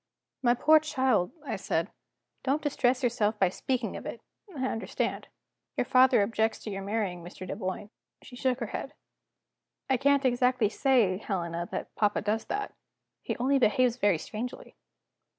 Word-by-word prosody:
"My 240 Hz, -2 st, +4 dB
poor 310 Hz, +5 st, +6 dB
child," 260 Hz, -, +1 dB
I 255 Hz, -, -2 dB
said, 170 Hz, -1 st, -1 dB, 0.5 s
"don't 280 Hz, +3 st, 0 dB
distress 260 Hz, -3 st, +1 dB
yourself 220 Hz, -3 st, +1 dB
by 190 Hz, -3 st, +3 dB
speaking 250 Hz, +4 st, -2 dB
of -, -, -7 dB
it; -, -, -6 dB, 0.4 s
I 260 Hz, -, -1 dB
understand. 225 Hz, -3 st, -2 dB, 0.5 s
Your -, -, +1 dB
father 255 Hz, -5 st, +5 dB
objects 220 Hz, +1 st, 0 dB
to 215 Hz, -, -5 dB
your 195 Hz, 0 st, -4 dB
marrying 195 Hz, -4 st, -2 dB
Mr. 180 Hz, +1 st, -9 dB
Dunboyne." 200 Hz, +1 st, -4 dB, 0.3 s
She 245 Hz, -, -12 dB
shook 255 Hz, 0 st, 0 dB
her -, -, 0 dB
head. -, -, -5 dB, 1.0 s
"I 260 Hz, -, +4 dB
can't 280 Hz, +1 st, +3 dB
exactly 250 Hz, -3 st, +3 dB
say, 220 Hz, -6 st, +2 dB
Helena, 170 Hz, -5 st, -3 dB
that -, -, -5 dB
papa 210 Hz, -1 st, +1 dB
does 215 Hz, +2 st, 0 dB
that. 410 Hz, 0 st, -3 dB, 0.5 s
He -, -, -3 dB
only 270 Hz, +3 st, +2 dB
behaves 245 Hz, +1 st, +3 dB
very 205 Hz, -7 st, +3 dB
strangely." 220 Hz, +9 st, -7 dB
235 Hz, 155 wpm, -29 LUFS, 205-260 Hz, 1.0 s, poor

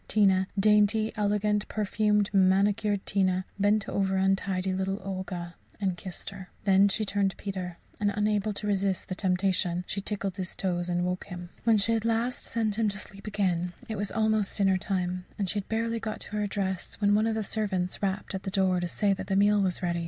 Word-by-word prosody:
Tina 190 Hz, -3 st, +3 dB
dainty, 210 Hz, +1 st, +4 dB
elegant, 210 Hz, 0 st, +1 dB
perfumed, 210 Hz, -1 st, +1 dB
manicured 200 Hz, +1 st, +3 dB
Tina 185 Hz, -1 st, +1 dB
bent 205 Hz, +1 st, +2 dB
over 195 Hz, -1 st, 0 dB
untidy 190 Hz, -1 st, +1 dB
little 190 Hz, +1 st, -1 dB
Olga 185 Hz, -2 st, -5 dB, 0.3 s
and 190 Hz, -3 st, 0 dB
kissed 185 Hz, +1 st, -7 dB
her. 190 Hz, -2 st, -10 dB
Then 195 Hz, 0 st, +5 dB
she 215 Hz, +2 st, -1 dB
turned 200 Hz, -1 st, +1 dB
to -, -, -11 dB
Peter, 185 Hz, -3 st, -5 dB, 0.2 s
and, 205 Hz, -1 st, +2 dB
unable 210 Hz, 0 st, +1 dB
to 210 Hz, +1 st, -5 dB
resist 195 Hz, -2 st, 0 dB
the -, -, -1 dB
temptation, 180 Hz, -2 st, 0 dB
tickled 200 Hz, -1 st, -3 dB
his 185 Hz, -1 st, -4 dB
toes 175 Hz, -2 st, -1 dB
and 175 Hz, 0 st, +1 dB
woke 180 Hz, 0 st, -2 dB
him. 175 Hz, -2 st, -8 dB, 0.2 s
When 225 Hz, -2 st, +5 dB
she 205 Hz, +3 st, +1 dB
had 225 Hz, -1 st, +2 dB
at 225 Hz, -, -2 dB
last 230 Hz, +2 st, 0 dB
sent 220 Hz, -3 st, -1 dB
him 220 Hz, -2 st, +3 dB
to 200 Hz, -, -3 dB
sleep 195 Hz, +1 st, -9 dB
again, 180 Hz, -4 st, 0 dB
it 220 Hz, -, -3 dB
was 205 Hz, 0 st, -2 dB
almost 220 Hz, -2 st, +1 dB
dinner 195 Hz, -2 st, +3 dB
time; 180 Hz, -2 st, -2 dB
and 200 Hz, -, -1 dB
she 205 Hz, -, -1 dB
had 195 Hz, -, -8 dB
barely 230 Hz, +1 st, 0 dB
got 220 Hz, -1 st, -3 dB
into 210 Hz, -, -7 dB
her 210 Hz, -1 st, 0 dB
dress 190 Hz, -2 st, -3 dB
when 205 Hz, -1 st, +3 dB
one 215 Hz, +2 st, +3 dB
of 225 Hz, -, 0 dB
the 220 Hz, -, -1 dB
servants 195 Hz, -4 st, -1 dB
rapped 195 Hz, 0 st, -2 dB
at 190 Hz, -, -3 dB
the 195 Hz, -, -4 dB
door 190 Hz, -2 st, +2 dB
to 175 Hz, -, -1 dB
say 200 Hz, +3 st, +1 dB
that 195 Hz, -, -5 dB
the 195 Hz, -, 0 dB
meal 205 Hz, +1 st, +4 dB
was 185 Hz, -1 st, 0 dB
ready. 170 Hz, -1 st, 0 dB
195 Hz, 210 wpm, -28 LUFS, 185-210 Hz, 0.3 s, Then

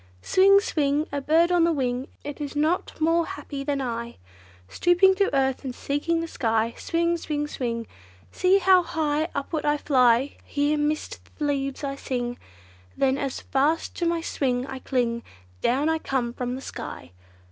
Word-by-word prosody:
Swing! 395 Hz, +1 st, +6 dB
swing! 300 Hz, -6 st, 0 dB
a 285 Hz, 0 st, -2 dB
bird 325 Hz, +5 st, +3 dB
on 350 Hz, -2 st, +4 dB
the 335 Hz, -, +3 dB
wing 255 Hz, -3 st, -1 dB, 0.2 s
It 290 Hz, +1 st, -7 dB
is 290 Hz, 0 st, -5 dB
not 310 Hz, +5 st, 0 dB
more 330 Hz, +2 st, +3 dB
happy 280 Hz, -3 st, -6 dB
than 280 Hz, 0 st, -1 dB
I! 235 Hz, -2 st, -4 dB, 0.5 s
Stooping 350 Hz, -, +4 dB
to 400 Hz, 0 st, +3 dB
earth, 265 Hz, -1 st, +1 dB
and 255 Hz, -2 st, -5 dB
seeking 330 Hz, +4 st, -1 dB
the 330 Hz, -, -4 dB
sky. 225 Hz, -5 st, 0 dB
Swing! 340 Hz, +1 st, 0 dB
swing! 295 Hz, -2 st, -2 dB
swing! 235 Hz, -5 st, -3 dB, 0.5 s
See 370 Hz, +1 st, +3 dB
how 375 Hz, -1 st, +5 dB
high 315 Hz, -2 st, -1 dB
upward 295 Hz, +3 st, -2 dB
I 295 Hz, 0 st, +2 dB
fly! 255 Hz, -2 st, +3 dB
Here, 290 Hz, +1 st, 0 dB
midst 300 Hz, +1 st, -2 dB, 0.2 s
the 300 Hz, -, -2 dB
leaves 275 Hz, -1 st, -2 dB
I 275 Hz, -1 st, -3 dB
swing; 245 Hz, -2 st, -3 dB, 0.6 s
Then, 270 Hz, 0 st, +2 dB
as 275 Hz, -2 st, -3 dB
fast 295 Hz, +5 st, 0 dB
to 345 Hz, -, 0 dB
my 335 Hz, 0 st, 0 dB
swing 255 Hz, -6 st, -1 dB
I 265 Hz, -1 st, -7 dB
cling, 240 Hz, -3 st, -1 dB, 0.4 s
Down 270 Hz, +5 st, +2 dB
I 320 Hz, 0 st, +1 dB
come 250 Hz, -5 st, -2 dB
from 250 Hz, 0 st, -3 dB
the 265 Hz, -, -7 dB
sky! 85 Hz, -, -8 dB
285 Hz, 170 wpm, -25 LUFS, 260-330 Hz, 0.6 s, Swing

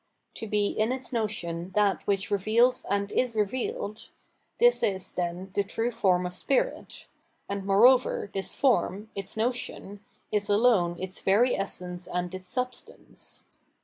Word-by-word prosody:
To 225 Hz, -, -5 dB
be 210 Hz, 0 st, +1 dB
in 215 Hz, +3 st, 0 dB
its 260 Hz, 0 st, -5 dB
notion 185 Hz, -6 st, -3 dB
that 205 Hz, -2 st, +2 dB
which 200 Hz, 0 st, 0 dB
reveals' 220 Hz, +5 st, +2 dB
and 200 Hz, 0 st, 0 dB
is 250 Hz, -3 st, 0 dB
revealed 215 Hz, 0 st, -2 dB, 0.2 s
— -, -, -45 dB
this 485 Hz, +1 st, +5 dB
is, 190 Hz, -2 st, -1 dB
then, 180 Hz, +2 st, -4 dB
the 200 Hz, -, +1 dB
true 225 Hz, +4 st, -2 dB
form 185 Hz, -6 st, +2 dB
of 180 Hz, -, -4 dB
spirit, -, -, -2 dB, 0.4 s
and 200 Hz, 0 st, -3 dB
moreover, 210 Hz, +2 st, +4 dB
this 195 Hz, 0 st, -1 dB
form, 220 Hz, -5 st, +1 dB
its 195 Hz, +2 st, -6 dB
notion, 220 Hz, -4 st, -3 dB, 0.3 s
is 210 Hz, -1 st, 0 dB
alone 205 Hz, -5 st, +3 dB
its 185 Hz, 0 st, -5 dB
very 225 Hz, +6 st, +3 dB
essence 180 Hz, -2 st, -4 dB
and 180 Hz, 0 st, -3 dB
its 185 Hz, 0 st, -7 dB
substance. 250 Hz, +5 st, -6 dB
205 Hz, 145 wpm, -27 LUFS, 190-235 Hz, 0.4 s, this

